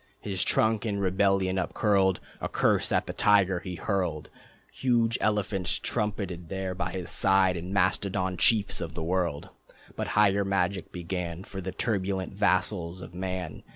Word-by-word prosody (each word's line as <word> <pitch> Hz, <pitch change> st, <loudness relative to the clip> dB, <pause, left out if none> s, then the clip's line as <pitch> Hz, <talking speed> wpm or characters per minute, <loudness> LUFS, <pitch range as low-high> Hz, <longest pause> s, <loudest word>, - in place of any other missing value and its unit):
His 95 Hz, -3 st, -2 dB
trunk 110 Hz, -1 st, +2 dB
in 105 Hz, -3 st, -1 dB
rebellion 95 Hz, 0 st, +2 dB
upcurled, 95 Hz, -1 st, +2 dB, 0.2 s
A -, -, -3 dB
curse -, -, +2 dB
at -, -, +2 dB
the -, -, -5 dB
tiger 95 Hz, -3 st, +4 dB
he 90 Hz, 0 st, -6 dB
hurled. 90 Hz, -5 st, -2 dB, 0.4 s
Huge 120 Hz, -3 st, +2 dB
elephants 100 Hz, -4 st, 0 dB
trumpeted 95 Hz, -5 st, -3 dB
there 95 Hz, -1 st, -3 dB
by 90 Hz, -, -3 dB
his 90 Hz, -2 st, -4 dB
side, 95 Hz, -1 st, +3 dB
And 90 Hz, +2 st, -5 dB
mastodon 95 Hz, -1 st, +1 dB
chiefs 110 Hz, 0 st, +2 dB
of 80 Hz, -1 st, -5 dB
the 85 Hz, -, -3 dB
world. 85 Hz, -4 st, -1 dB, 0.5 s
But -, -, -3 dB
higher 100 Hz, -1 st, +4 dB
magic 95 Hz, -2 st, -1 dB
began. 90 Hz, 0 st, -4 dB
For 95 Hz, -1 st, -7 dB
the 95 Hz, +1 st, -4 dB
turbulent 95 Hz, -5 st, -1 dB
vassals 95 Hz, -3 st, 0 dB
of -, -, -10 dB
man. 90 Hz, -3 st, -4 dB
95 Hz, 155 wpm, -28 LUFS, 90-100 Hz, 0.5 s, tiger